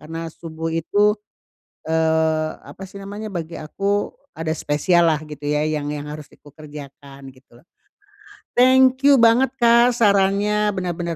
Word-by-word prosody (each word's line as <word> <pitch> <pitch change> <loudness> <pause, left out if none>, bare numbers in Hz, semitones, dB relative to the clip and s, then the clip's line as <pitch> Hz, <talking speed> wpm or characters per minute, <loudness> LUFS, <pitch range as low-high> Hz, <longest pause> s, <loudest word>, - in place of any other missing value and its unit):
Karena 165 +2 -7
subuh 165 0 -7
itu, 205 +6 +1 0.7
eee, 160 -1 +1
apa 195 - -11
sih 200 - -14
namanya, 205 +2 -7
bagi 165 -2 -6
aku, 200 +6 -2 0.2
ada 160 0 -3
spesial 170 +4 +2
lah, 155 -2 +1
gitu 150 -1 -11
ya, 150 0 0
yang 150 -2 -3
yang 145 0 -6
harus 150 -1 -9
di - - -20
kukerjakan, 140 -2 -12
gitulah. 130 0 -22 0.9
Thank 260 +1 +4
you 285 - +7
banget, 240 +3 +4
Kak, 235 0 +4
sarannya. 205 0 +2
Benar-benar 175 -2 -3
165 Hz, 140 wpm, -21 LUFS, 150-205 Hz, 0.9 s, you